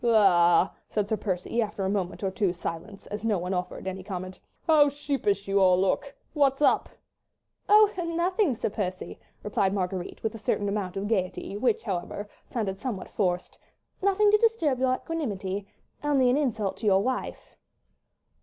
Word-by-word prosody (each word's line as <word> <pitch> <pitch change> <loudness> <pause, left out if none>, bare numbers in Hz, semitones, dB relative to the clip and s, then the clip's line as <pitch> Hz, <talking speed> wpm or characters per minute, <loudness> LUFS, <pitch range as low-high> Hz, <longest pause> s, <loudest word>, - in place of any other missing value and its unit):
"La!" 190 -6 +5 0.2
said 210 -2 -1
Sir 220 - +1
Percy, 200 +3 -2
after 210 -3 -2
a - - 0
moment 195 -1 -2
or 190 - 0
two's 185 -2 0
silence, 175 +4 -6
as 210 +1 -6
no 220 -3 +2
one 180 +2 -3
offered 180 0 -4
any 190 0 -4
comment, 185 -1 -6 0.3
"how 300 -3 +6
sheepish 275 -9 -1
you 195 0 +2
all 185 -1 +5
look.... 195 +9 0 0.2
What's 275 -3 +2
up?" 295 - +3 0.8
"Oh, 425 0 +7
nothing, 340 - +1
Sir 215 - -2
Percy," 185 -3 -4 0.2
replied 200 -1 0
Marguerite, 185 -1 -3
with 220 - -1
a 225 - -8
certain 205 -1 -1
amount 200 -2 -2
of 200 +1 -2
gaiety, 195 -2 -2
which, 225 +1 +1
however, 200 0 -4 0.2
sounded 195 -5 -2
somewhat 210 -5 -4
forced, 180 -3 -2 0.4
"nothing 400 +2 +4
to 425 - +5
disturb 415 - +2
your 255 0 +2
equanimity—only 250 +1 -2
an - - +3
insult 225 -9 -1
to 220 - -3
your 195 0 +4
wife." 255 0 -4
205 Hz, 165 wpm, -27 LUFS, 190-260 Hz, 0.8 s, Oh